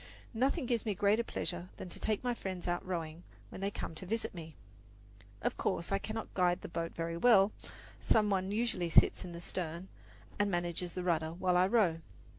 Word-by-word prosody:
Nothing 265 +5 +1
gives 235 -2 0
me 210 -3 -1
greater 205 +4 +3
pleasure 175 -4 -4
than - - -6
to - - -7
take 215 +1 -1
my 245 -1 +1
friends 185 -6 -5
out 175 0 0
rowing 170 -3 -4 0.3
when - - -8
they 195 - +1
visit 190 +4 -3
me. 160 -3 -8 0.9
Of - - 0
course, 170 - -1
I 195 - +2
cannot 220 +2 -5
guide 180 -1 +2
the - - -7
boat 165 0 -3
very 165 0 -2
well. 205 -1 +6 0.5
Some 210 -2 +3
one 190 0 0
usually 210 -6 0
sits - - +5
in 180 - -7
the 170 0 -7
stern 175 +1 -4 0.5
and 205 0 +3
manages 175 -1 -2
the 180 - -2
rudder 160 -2 +1
while 180 +1 +1
I 180 +1 +5
row. 195 -7 +3
185 Hz, 190 wpm, -33 LUFS, 170-210 Hz, 0.9 s, well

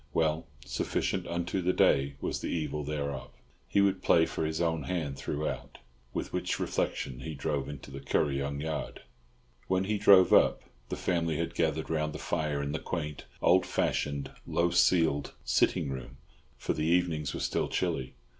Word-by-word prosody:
Well, 80 0 +1 0.2
sufficient 95 -2 -1
unto 85 +2 -1
the 90 +1 +2
day 70 0 +3
was - - -2
the - - -3
evil 75 -2 -2
thereof. 70 -2 -3 0.4
He 100 - +3
would 95 -1 +2
play 80 -3 +5
for 80 - -2
his 80 0 -2
own 80 -3 0
hand 80 -7 -2
throughout. 75 +2 -4 0.3
With - - -4
which - - -1
reflection 65 -2 -2
he 80 -1 -5
drove 70 -1 -2
into 70 -1 -8
the 70 - -6
Kuryong 70 0 0
yard. 80 0 -4 0.6
When 95 0 +2
he 105 +2 -1
drove 100 -3 +7
up, - - +5 0.3
the - - -2
family 85 -3 0
had 85 +1 -2
gathered - - 0
round 75 -1 0
the - - -5
fire 75 -3 -1
in 70 - -2
the 80 - -2
quaint, 75 -4 -4 0.2
old - - +6
fashioned, 70 -1 -1 0.2
low 85 0 +2
ceiled 80 -6 +3
sitting 70 - +2
room; 65 0 -7 0.4
for - - -1
the 75 0 -1
evenings 85 -5 +1
were - - -3
still - - 0
chilly. 65 0 -2
75 Hz, 170 wpm, -30 LUFS, 70-85 Hz, 0.6 s, drove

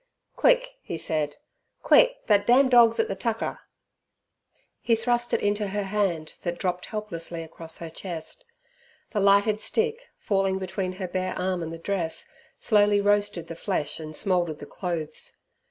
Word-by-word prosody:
"Quick," - - +3
he 165 - -5
said 155 -2 -1 0.5
"quick, - - +5
that 205 -1 +3
damn 260 +2 +6
dog's 240 - +6
at 450 - +3
the - - -2
tucker." - - -2 1.2
He 230 - +3
thrust 240 +1 0
it - - +1
into 205 0 0
her 205 +1 -2
hand 190 -6 -1
that 175 -1 -3
dropped 180 -1 -2
helplessly 170 -6 -5
across 165 0 -7
her 165 - -7
chest. 175 - -6 0.7
The 210 - 0
lighted 200 +2 +4
stick, 460 +2 -1
falling 195 -2 +1
between 190 0 -3
her 185 0 -4
bare 185 +1 -2
arm 185 -1 -1
and 165 -1 -4
the 165 - -6
dress, 165 -1 -3 0.3
slowly 205 -2 +3
roasted 205 -3 +1
the - - -6
flesh 165 -4 -2
and 155 -1 -7
smouldered 175 -2 0
the 145 - -9
clothes. 170 -2 -4
195 Hz, 155 wpm, -26 LUFS, 170-215 Hz, 1.2 s, damn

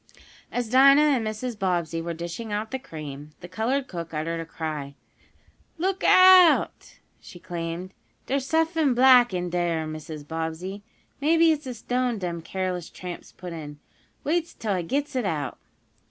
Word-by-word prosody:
As 245 -1 -2
Dinah 275 +4 +7 0.2
and 225 -3 -1
Mrs. 215 +1 -4
Bobbsey 170 -4 -1
were 170 0 -4
dishing 170 +7 -6
out 210 +1 -3
the 265 - -3
cream, 150 - -9
the 175 - -8
colored 240 +9 -1
cook 170 -4 -6
uttered 165 +2 -2
a 165 - -6
cry. 155 -4 -5 0.8
"Look 380 +3 -1
out!" 370 -2 +6 0.2
she - - -13
exclaimed. 175 +1 -5 0.3
"Dere's 270 0 -1
suffin 320 -4 +2
black 250 -2 +6
in 180 -1 -3
dere, 170 -2 0
Mrs. 155 -1 -8
Bobbsey. 165 +5 -4 0.4
Maybe 325 +2 +4
it's 300 -3 -2
a 250 - -5
stone 245 +1 -1
dem 175 -3 -4
careless 185 0 -4
tramps 180 -1 -8
put 180 -2 -9
in. 150 -3 -8 0.5
Wait 335 +3 -1
'till 215 -3 -2
I 185 - -1
gits 280 - -2
it 255 - 0
out." 150 -7 -3
185 Hz, 155 wpm, -25 LUFS, 165-260 Hz, 0.8 s, Dinah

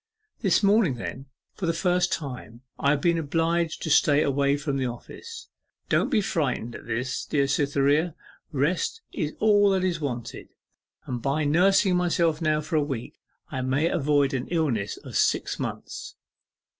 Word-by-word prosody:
This 195 -1 +2
morning 200 - +4
then, 130 +3 -6 0.3
for 185 - -4
the 165 - +2
first 180 +1 +1
time, 125 -7 -5 0.2
I 140 - +2
have 145 0 +2
been 170 0 +2
obliged 165 +2 0
to 160 - -2
stay 145 0 +5
away 140 0 +2
from 145 -1 -2
the 130 -1 0
office. 450 - -9 0.4
Don't - - +2
be 230 -7 +2
frightened 140 - -1
at - - -10
this, 125 +3 -2
dear 140 -2 +1
Cytherea. 145 +3 +1 0.4
Rest 165 - 0
is 150 0 -2
all 205 -2 +5
that 190 -1 +1
is 175 -3 -1
wanted, 125 -5 -5 0.6
and 125 -2 -4
by 140 +4 0
nursing 185 +5 +4
myself 170 -3 +1
now 155 -1 +1
for 155 +1 -1
a 150 - +3
week, 135 -5 -5 0.3
I 130 - -2
may 135 +6 +1
avoid 145 -2 +2
an 130 -2 -2
illness 135 - -1
of - - -10
six - - +1
months. - - -6
150 Hz, 165 wpm, -26 LUFS, 135-175 Hz, 0.6 s, stay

